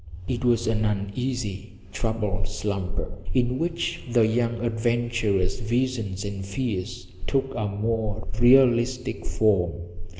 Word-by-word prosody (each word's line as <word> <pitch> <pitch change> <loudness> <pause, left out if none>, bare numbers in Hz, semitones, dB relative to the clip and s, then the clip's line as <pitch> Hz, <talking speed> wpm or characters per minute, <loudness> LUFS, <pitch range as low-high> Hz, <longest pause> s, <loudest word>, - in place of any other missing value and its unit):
It 120 -1 -2
was 120 -1 +3
an 110 -1 +1
uneasy, 105 0 -2 0.2
troubled 105 -3 -1
slumber 100 -2 -3 0.2
in 125 0 +2
which 170 0 -1
the 115 -2 +5
young 115 +1 +1
adventurer's 115 -4 +1
visions 115 -4 -1
and 100 -1 -4
fears 100 -1 -4 0.2
took 135 -1 0
a 105 -3 -1
more 110 +1 -2
realistic 120 -2 +4
form. 95 -6 +2
110 Hz, 110 wpm, -25 LUFS, 100-120 Hz, 0.2 s, the